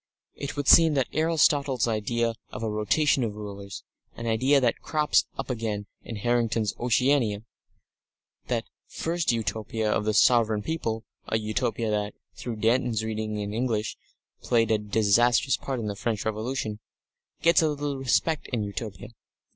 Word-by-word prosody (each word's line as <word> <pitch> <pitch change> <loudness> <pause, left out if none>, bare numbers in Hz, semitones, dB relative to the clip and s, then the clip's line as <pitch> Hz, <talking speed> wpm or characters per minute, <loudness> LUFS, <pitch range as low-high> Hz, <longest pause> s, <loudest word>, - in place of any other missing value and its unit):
It 140 0 -6
would 145 - -2
seem 160 -2 +7
that 135 -3 +1
Aristotle's 145 -5 +2
idea 115 +1 0 0.2
of - - -7
a 110 - -1
rotation 120 +6 +2
of 110 -3 -3
rulers, 100 -1 -8 0.3
an 115 - -7
idea 130 +5 +3
that 120 -3 0
crops 150 -1 +2
up - - -3
again 110 -4 -3 0.2
in 115 - -7
Harrington's 115 -1 0
Oceana, 120 -3 +2 1.0
that - - -1 0.2
first 170 -2 -1
Utopia 110 -1 -2
of 105 - 0
"the 110 -1 +1
sovereign 110 -2 +4
people" 115 -8 -3 0.2
(a 110 - +1
Utopia 110 +1 -1
that, 105 -1 -2 0.2
through 120 -2 -5
Danton's 115 0 +1
readings 110 -1 -3
in 105 0 -4
English, 110 -2 -1 0.5
played 115 -2 +2
a 110 - +3
disastrous 110 +5 +3
part 135 -2 -4
in 115 - -4
the 105 -1 -3
French 110 0 -2
Revolution), 110 0 -3 0.6
gets 170 +2 +5
a 160 - +2
little 145 -2 -3
respect 145 +4 +1
in 115 -4 -2
Utopia. 100 -1 -6
115 Hz, 150 wpm, -26 LUFS, 105-130 Hz, 1.0 s, seem